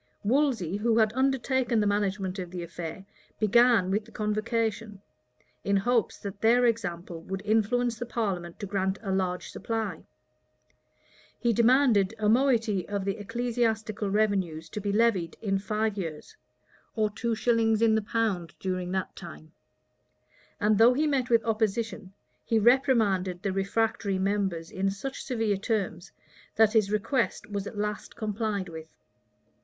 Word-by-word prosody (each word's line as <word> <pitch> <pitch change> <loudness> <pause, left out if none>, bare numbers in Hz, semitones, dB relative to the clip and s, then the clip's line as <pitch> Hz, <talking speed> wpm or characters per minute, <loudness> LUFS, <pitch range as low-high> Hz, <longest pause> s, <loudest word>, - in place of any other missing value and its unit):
Wolsey, 225 - +1
who 225 +2 +1
had 220 -1 +3
undertaken 260 -2 +1
the 210 - +2
management 200 -2 -1
of 180 -2 -5
the 175 -1 -5
affair, 170 +2 -7 0.3
began 225 -3 +4
with 205 +2 0
the 225 - -17
convocation, 215 0 -2 0.6
in 200 0 +2
hopes 235 +3 +1
that 200 0 -8
their 240 +2 +4
example 175 -7 -2
would 190 +3 -6
influence 225 +2 +1
the 240 - -3
parliament 185 -8 -3
to - - -4
grant 190 -1 -1
a 195 - -2
large 185 -1 -1
supply. 225 -1 -3 1.4
He 235 -2 +2
demanded 230 -3 +4
a 215 -1 0
moiety 225 -5 +2
of 200 -2 -2
the 195 +1 -1
ecclesiastical 225 -2 -1
revenues 190 -6 0
to 210 - -5
be 200 0 -1
levied 205 -6 +1
in 195 -3 0
five 215 +1 -1
years, 160 -5 -6 0.6
or 215 -2 +1
two 230 +2 -2
shillings 225 -1 +2
in 225 -1 +4
the 220 - +2
pound 210 -6 -2
during 185 -1 -3
that 190 0 -3
time; 160 -3 -11 1.1
and 210 -1 +2
though 235 +2 +7
he 305 +3 +2
met 275 -4 0
with 230 -2 +4
opposition, 220 -2 -1 0.3
he 225 - +1
reprimanded 215 -7 +3
the 195 - -1
refractory 200 0 0
members 190 -4 -1
in 195 +1 0
such 265 +8 -5
severe 225 -6 0
terms, 195 -4 -2 0.4
that 220 -1 +4
his 215 -3 +3
request 225 +1 -1
was 200 -1 -3
at 215 - -8
last 210 0 -4
complied 210 -3 -2
with. 160 -1 -9
210 Hz, 150 wpm, -28 LUFS, 195-230 Hz, 1.4 s, though